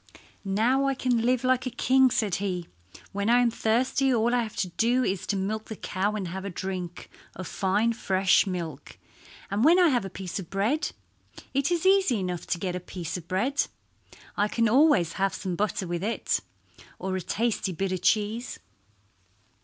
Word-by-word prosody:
"Now 230 +8 +2
I 275 - +1
can 250 -2 +1
live 250 +1 +1
like 255 0 +2
a - - 0
king," 260 +2 +4
said 220 -6 0
he. 180 -4 -2 0.4
"When 200 +2 -1
I 240 - +6
am 245 -1 +3
thirsty 255 +5 +1
all 235 0 +2
I 245 - +3
have 220 -2 -5
to 185 - -1
do 240 +8 +2
is 190 -5 -2
to 205 - 0
milk 210 +3 -2
the 220 - -7
cow 200 +1 -2
and 190 -4 -3
have 190 +2 -5
a 200 - -4
drink 180 -1 -5 0.3
of 185 - -6
fine 205 +4 +1
fresh 190 -2 +2
milk; 175 -4 -5 0.5
and 205 +3 +1
when 330 +5 +6
I 355 -2 +6
have 245 -6 +1
a 195 - -5
piece 185 0 -5
of 175 - -8
bread—it 275 - -3
is 345 0 0
easy 380 - +4
enough 180 -2 -4
to - - 0
get 180 0 -3
a - - -2
piece 175 -2 -6
of 175 -2 -7
bread—I 210 - -3
can 230 +2 +1
always 225 - +4
have 195 0 +1
some 185 -3 -3
butter 200 0 -1
with 175 0 -3
it, 225 +3 0 0.6
or 190 0 -3
a 185 - -2
tasty 215 0 -1
bit 190 +2 -2
of 185 -2 -2
cheese." 215 +5 0
210 Hz, 185 wpm, -27 LUFS, 185-245 Hz, 0.6 s, I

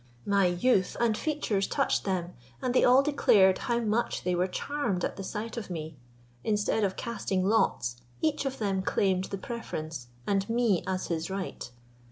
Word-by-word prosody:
My 200 -2 +3
youth 185 +2 +2
and 230 -2 +2
features 230 -8 -1
touched - - 0
them, 180 -3 -1 0.3
and 250 -1 -1
they - - +4
all 255 +2 +6
declared 205 -10 +4
how 235 -1 0
much 225 +1 0
they 180 - 0
were 180 +1 +1
charmed 210 -3 -2
at - - -3
the 195 - -6
sight 220 +4 -5
of 215 -4 -5
me. 160 -3 -5 0.5
Instead 210 0 +1
of 190 -2 0
casting 195 -5 -2
lots, 190 - +1 0.2
each 310 -2 0
of 270 -1 -3
them 195 -3 0
claimed 190 -1 +1
the 195 - -5
preference, 160 - -5 0.2
and 195 +1 0
me 230 -6 +2
as 185 -1 -2
his 165 0 -2
right. 190 -8 -5
200 Hz, 175 wpm, -29 LUFS, 185-235 Hz, 0.5 s, all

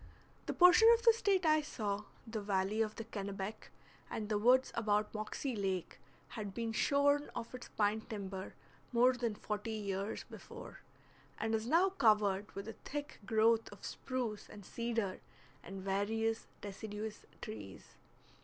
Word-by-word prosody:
The - - 0
portion 360 +5 +8
of 465 - -6
the 460 -2 +8
State 395 -5 +2
I 310 -1 +5
saw 210 -8 -3 0.2
the 220 -2 -4
valley 200 +1 0
of 215 -1 0
the 225 - -5
Kennebec 200 -1 -5 0.4
and 215 -1 -4
the 210 -1 +1
woods 255 +4 +5
about 210 -2 +1
Moxie 225 +4 -3
Lake 190 -4 -2 0.3
had 205 -3 -6
been 230 -1 -2
shorn 285 +4 +3
of 230 - -5
its 250 - -8
pine 210 +1 +1
timber 195 -3 -5 0.4
more 250 +1 +5
than 240 -3 -2
forty 210 +1 -3
years 200 -1 -3
before, - - -10 0.6
and 220 +1 -1
is 220 +1 0
now 345 +8 +5
covered 210 - +3
with 200 +2 -6
a 225 - -5
thick 290 +1 -5
growth 225 +1 +3
of - - -11
spruce 245 -5 -4
and 205 -2 -11
cedar 230 -4 -2 0.4
and 190 +1 -8
various 225 +4 0 0.2
deciduous 210 +1 -6
trees. 105 -7 -8
220 Hz, 150 wpm, -35 LUFS, 205-245 Hz, 0.6 s, portion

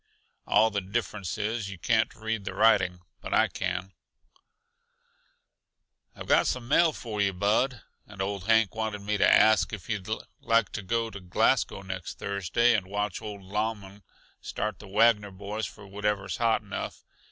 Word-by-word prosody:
All 110 +2 +4
the 100 -1 -1
difference 100 -1 -3
is, 110 -1 -2
you 95 - -7
can't 110 +5 +1
read 110 -1 -3
the 95 - -5
writing; 95 -5 +3 0.2
but - - -2
I - - +5
can." 95 0 -3 2.2
"I've - - -8
got - - +4
some 125 -2 -2
mail 165 +4 +4
for 110 -7 -4
yuh, 100 -1 +2
Bud. 105 +5 +1 0.2
And 100 -1 -13
old 95 -1 -2
Hank 110 -2 +4
wanted 110 -2 -3
me 105 +1 0
to - - +5
ask 110 0 +5
yuh - - -2
if 95 -1 -14
you'd 105 -3 -3 0.3
like 115 -3 +2
to - - -4
go 115 +3 -1
to 100 - -8
Glasgow 90 +1 +1
next 95 -2 -6
Thursday 100 +5 +1
and 95 -3 -1
watch 105 0 -2
old 105 -2 -7
Lauman 105 0 -3 0.4
start 105 -2 -4
the 105 - -11
Wagner 105 +1 +3
boys 100 +3 -5
for - - -13
wherever's 100 -1 -2
hot 115 -2 +2
enough. 100 - -6
105 Hz, 165 wpm, -28 LUFS, 95-110 Hz, 2.2 s, I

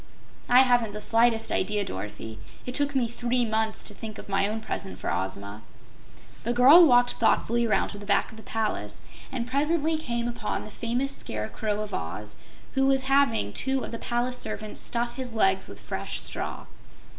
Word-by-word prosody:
"I 250 +1 +8
haven't 245 -5 +3
the 210 - -5
slightest 225 +1 +3
idea, 205 +1 0
Dorothy. 105 - -6 0.3
It 250 - -5
took 285 +1 +1
me 250 -3 +2
three 240 +1 0
months 220 0 -1
to 210 - -2
think 215 +1 -8
of - - -10
my 195 0 +1
own 215 +2 -3
present 200 -3 -5
for - - -3
Ozma." 100 +3 -4 0.8
The 240 - 0
girl 270 +8 +8
walked 245 -5 +5
thoughtfully 235 +1 +2
around 215 - +1
to 205 - -6
the 205 - -9
back 200 -1 +2
of 220 - -13
the - - -10
palace, 220 0 -3 0.3
and 245 -3 -3
presently 305 +4 +1
came 235 -5 -2
upon 235 -3 -3
the 215 - -10
famous 245 +6 -2
Scarecrow 205 - -3
of 215 - -6
Oz, 105 +6 -5 0.4
who 270 0 +3
has 270 -1 +2
having 270 - +2
two 265 -1 0
of - - -6
the 230 - -5
palace 245 +1 -1
servants 215 0 -4
stuff 240 +1 -2
his 250 -3 -4
legs 195 -3 +2
with - - -10
fresh - - -4
straw. - - -3
230 Hz, 185 wpm, -27 LUFS, 205-250 Hz, 0.8 s, I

